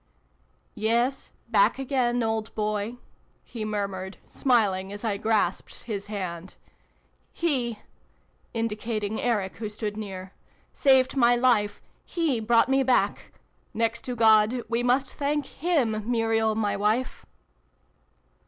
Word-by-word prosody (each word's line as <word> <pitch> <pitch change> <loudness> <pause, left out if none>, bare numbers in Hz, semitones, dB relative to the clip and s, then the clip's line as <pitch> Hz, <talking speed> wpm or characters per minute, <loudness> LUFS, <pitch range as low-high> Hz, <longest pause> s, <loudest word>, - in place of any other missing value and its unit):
" - - -41 0.2
Yes, 245 +4 +1 0.2
back - - +3
again, 250 -3 0
old 220 0 -2
boy! 215 +2 -2 0.2
" - - -38 0.2
he 225 -3 -7
murmured, 195 -3 -3
smiling 200 -7 +1
as 205 +2 -7
I 210 -3 0
grasped 210 -4 -1
his 205 -4 -5
hand. 185 -4 -5 0.4
" - - -41
He" 250 -9 +1 0.7
indica 225 -1 -2
ting 210 +1 -3
Eric, 210 -6 -1
who 220 -2 -4
stood 210 0 -4
near, 190 -3 -7 0.4
"saved 265 -1 +4
my 245 -2 +5
life 230 -5 +2 0.2
He 320 -8 -1
brought 230 +1 +3
me 270 +1 +3
back. 260 -1 +1 0.4
Next 230 +1 0
to 250 - -3
God, 225 +1 +4
we 230 +1 0
must 250 +2 +1
thank 290 0 -1
him, 245 -11 -1
Muriel, 225 -2 +1
my 210 -2 0
wife 215 +5 -1
225 Hz, 130 wpm, -26 LUFS, 210-245 Hz, 0.7 s, my